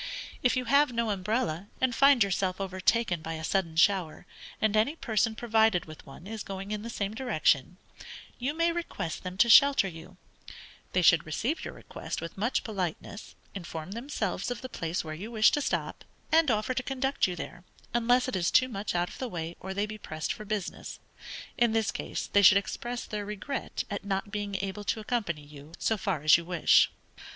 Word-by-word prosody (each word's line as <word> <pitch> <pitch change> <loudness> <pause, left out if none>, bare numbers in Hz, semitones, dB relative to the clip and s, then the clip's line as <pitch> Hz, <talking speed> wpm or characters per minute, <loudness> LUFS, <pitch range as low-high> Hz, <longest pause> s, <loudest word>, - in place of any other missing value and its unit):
If 250 0 +2
you 255 - -1
have 280 +2 +4
no 230 -2 0
umbrella, 195 -3 -1
and 260 -2 +2
find 275 -1 +6
yourself 190 -1 -1
overtaken 190 0 0
by 165 +1 -5
a 160 0 -6
sudden 165 -1 0
shower, 175 -2 +2 0.3
and 215 -1 +1
any 225 +9 +2
person 225 -6 0
provided 220 -5 +2
with 155 -1 -12
one 135 +5 -12
is 220 +1 -6
going 195 +1 -6
in 210 -1 -2
the 230 - -6
same 205 -3 -3
direction, 180 - +1 0.6
you 270 +5 -2
may 335 +1 +2
request 335 - -4
them 185 0 -6
to 230 - +5
shelter 275 -3 +7
you; 180 +1 -11 0.8
they 180 - +2
should 165 -1 +6
receive 240 - -2
your - - -6
request - - -6
with 165 +1 -7
much 225 +6 0
politeness, 195 -1 -5 0.2
inform 170 -2 -7
themselves 225 -5 -3
of 245 -1 -4
the 255 - -7
place 165 -5 -3
where 155 -1 -6
you 190 +8 -7
wish 225 -1 +4
to 295 - 0
stop, - - -2 0.3
and 320 -2 +5
offer 215 +2 +1
to 260 - -1
conduct 270 -1 0
you 180 - -4
there, 175 0 -8 0.3
unless 245 +2 +3
it 255 - -2
is 175 -2 +1
too 255 0 +4
much 200 -4 -4
out 175 0 +1
of - - -11
the 255 - -3
way, 170 -3 -5
or 190 - -6
they 200 +2 0
be 215 0 -8
pressed 155 -4 -4
for 215 - -9
business; 210 -3 -4 0.6
in 235 -2 +3
this 225 -2 +1
case, - - -4
they 200 - +3
should 195 0 +8
express 240 +4 -4
their 210 -1 -4
regret 210 +7 -4
at 200 - -3
not 200 +1 -2
being 205 -1 -3
able 200 +1 -4
to 220 - -1
accompany 210 -9 -2
you 145 +1 -13
so 220 - +1
far 190 -8 -2
as 155 0 +7
you 170 - -6
wish. 175 -1 +4
205 Hz, 200 wpm, -29 LUFS, 180-235 Hz, 0.8 s, should